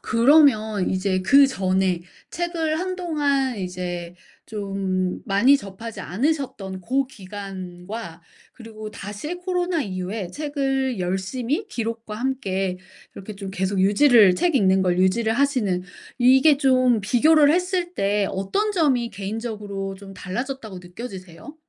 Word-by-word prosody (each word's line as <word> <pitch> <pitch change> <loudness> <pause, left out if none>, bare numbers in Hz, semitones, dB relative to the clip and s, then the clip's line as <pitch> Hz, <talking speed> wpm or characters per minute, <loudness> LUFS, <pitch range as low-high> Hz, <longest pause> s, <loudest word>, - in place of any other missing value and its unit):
그러면 230 -6 +4
이제 185 0 0
그전에 190 -6 +3 0.3
책을 330 -2 -2
한동안 300 -8 -1
이제 180 -2 -5 0.3
좀 195 -3 -2
많이 235 +7 +4
접하지 225 -1 -8
않으셨던 220 - -2
고 265 +8 0
기간과 190 -3 -8 0.3
그리고 220 -2 -9
다시 210 - -6
코로나 360 -2 -1
이후에 185 -1 -4
책을 270 -2 -1
열심히 230 - -2
기록과 230 - -4
함께 195 -8 -2 0.4
이렇게 210 +2 -8
좀 195 -1 -6
계속 190 +1 -2
유지를 205 0 +6
책 335 - +1
읽는 190 -6 +4
걸 180 -1 +1
유지를 220 +5 +2
하시는 240 -9 +1 0.4
이게 265 +4 +6
좀 255 -4 +3
비교를 290 +8 +4
했을 360 0 0
때 200 - +1
어떤 295 - -1
점이 270 - +1
개인적으로 205 -1 -5
좀 195 0 -11
달라졌다고 225 +1 -5
느껴지세요? 185 - -10
220 Hz, 270 characters per minute, -23 LUFS, 190-275 Hz, 0.4 s, 유지를